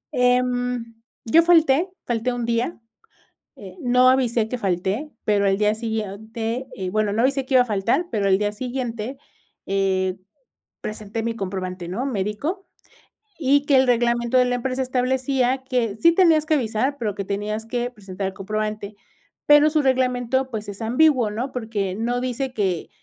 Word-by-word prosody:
Eh, 250 0 +4 0.8
yo 275 +9 +6
falté, 335 -1 +4 0.2
falté 240 +1 -1
1 240 -1 -3
día. 235 +7 -1 0.8
Eh, - - -11
no 250 0 +4
avisé 240 -4 +2
que 250 +2 -4
falté, 195 - -1 0.2
pero 205 -1 +2
al 195 0 +2
día 210 0 +2
siguiente 220 +2 -4
Eh, 185 -1 -4
bueno, 215 0 0
no 225 +3 +1
avisé 270 0 +1
que 265 - +1
iba 250 - +7
a - - -8
faltar, 230 - 0
pero 205 -3 0
al 190 -1 +4
día 205 0 -1
siguiente, 245 +1 -4 0.5
eh, 190 -1 0 0.6
presenté 215 +1 -5
mi 230 0 -2
comprobante, 185 -2 -4
¿no?, 225 +9 -3
médico. 270 - -3 0.7
Y 285 -1 +2
que 280 -2 +4
el 260 0 +4
reglamento 240 +1 +2
de 250 - +6
la 245 0 0
empresa, 255 +1 -2
establecía, 260 0 0
que 245 -5 -1
sí 335 +10 +5
tenías 330 -4 +4
que 315 -1 +2
avisar, 255 +2 -1
pero 215 -6 -3
que 200 - -3
tenías 210 +3 -3
que 245 +1 -2
presentar 195 -4 -6
el 190 - -5
comprobante. 210 +1 -4 0.5
Pero 295 +1 +6
su 310 -1 +2
reglamento, 260 0 +1
pues, 215 -2 -5
es 200 +2 -8
ambiguo, 250 -1 +3
¿no? 245 +5 -4
Porque 215 -6 -3
no 235 +3 -1
dice 255 +1 -3
que 190 -7 -1
235 Hz, 165 wpm, -22 LUFS, 210-260 Hz, 0.8 s, iba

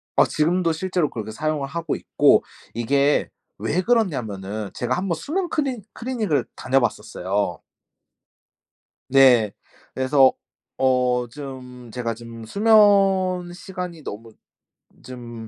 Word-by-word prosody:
아. - - +6
지금도 170 +2 +1
실제로 180 -2 -1
그렇게 110 -1 -6
사용을 150 +2 -2
하고 165 +1 -3
있고 - - +3 0.3
이게 140 +5 +1 0.3
왜 180 +4 -1
그러냐면은 110 - -1
제가 125 +1 -1
한번 180 -2 -1
수면 345 - -3
크리 270 -7 -1
클리닉을 220 - -1
다녀봤었어요. 105 -7 -1 1.5
네. 125 -6 +6 0.4
그래서 130 0 +4 0.5
어 125 -2 +2
좀 125 -3 -9
제가 120 -2 -2
좀 115 -1 -10
수면 195 - +4
시간이 180 -3 -7
너무 115 0 -8 0.7
좀 120 -3 -9
140 Hz, 235 characters per minute, -23 LUFS, 120-180 Hz, 1.5 s, 아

